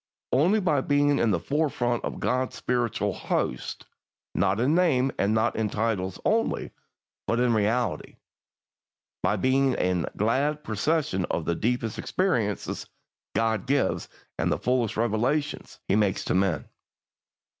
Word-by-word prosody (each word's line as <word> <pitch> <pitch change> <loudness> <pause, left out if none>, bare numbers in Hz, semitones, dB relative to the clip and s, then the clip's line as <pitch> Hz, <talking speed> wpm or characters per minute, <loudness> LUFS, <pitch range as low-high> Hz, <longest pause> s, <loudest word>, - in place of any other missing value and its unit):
Only 170 +12 +4
by 155 -8 +2
being 145 0 +2
in 115 - +3
the 90 -5 +2
forefront 130 - 0
of - - -4
God's 130 0 0
spiritual 120 -3 -1
hosts; 60 - -3 0.5
not 95 +3 +1
in 130 +6 +2
name 140 -7 +3
and 105 +3 +2 0.2
in 110 -2 -1
titles 100 -4 -1
only, 225 +1 +1 0.6
but 115 - +1
in 125 -1 +3
reality; 110 +1 0 1.1
by - - +2
being 130 0 +2
in 90 -3 0
glad 140 +8 +1
possession 110 - 0
of 80 - -2
the 85 - +1
deepest 115 +4 -1
experiences 115 - -1 0.5
God 110 +1 0
gives, 140 +1 +1 0.3
and - - +1
the - - +1
fullest 120 -4 0
revelations 120 +7 -1
He 95 - +2
makes 105 -3 +1
to - - 0
men. 95 -5 +1
120 Hz, 135 wpm, -26 LUFS, 105-140 Hz, 1.1 s, Only